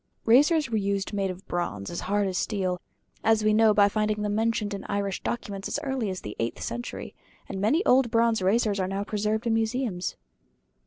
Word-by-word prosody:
Razors 295 +6 +5
were 220 - +1
used 200 0 -1
made 195 -1 0
of 185 +2 -7
bronze 105 - -3
as 170 - -4
hard 205 0 +2
as 185 - -3
steel, 185 -3 -1 0.4
as 220 -1 +3
we 215 0 +4
know 220 0 +5
by 205 -1 +5
finding 210 0 0
them 205 0 -1
mentioned 220 -1 0
in 200 - -5
Irish 200 -1 -2
documents 200 -4 -4
as - - -2
early 265 -6 -1
as 185 -1 -4
the 105 - -7
eighth 115 +1 -2
century; 240 0 -5 0.3
and 190 -1 -5
many 295 - +2
old 255 -1 +4
bronze 230 -2 +2
razors 205 +1 +2
are 185 - 0
now 195 +1 -2
preserved 215 +2 -1
in 230 - +2
museums. 225 -4 -1
210 Hz, 200 wpm, -27 LUFS, 195-225 Hz, 0.4 s, Razors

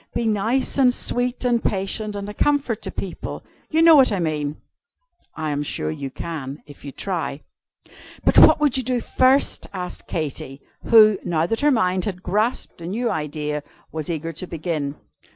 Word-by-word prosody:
Be 235 - 0
nice 225 +6 0
and 255 -2 +6
sweet 245 0 -1
and 240 -2 +2
patient, 205 +2 -2
and 200 0 -5
a 210 - -6
comfort 275 -2 0
to - - -5
people. 185 -3 -6 0.3
You 320 +1 +3
know 330 -1 +9
what 265 -5 +6
I 200 - 0
mean." 150 -3 -2 0.8
"I 155 -1 -2
am 145 0 -1
sure 80 - -2
you 135 - -5
can, 140 -1 -6
if 145 -2 -15
you 140 - -7
try." 165 -4 -4 0.8
"But - - +6
what - - +8
would 290 -4 +3
you 260 - 0
do 250 0 0
first?" 260 +3 +2
asked 180 -2 -6
Katy; 140 -4 -4 0.3
who, 215 -3 +6
now 165 -2 0
that 225 +6 -1
her 295 - +4
mind 185 -8 +1
had 185 -3 -5
grasped 210 0 -1
a 165 - -6
new 230 +6 -1
idea, 150 -1 -3 0.3
was 155 0 -4
eager 165 0 -3
to 170 +3 -6
begin. 155 -4 -3
185 Hz, 180 wpm, -22 LUFS, 155-235 Hz, 0.8 s, know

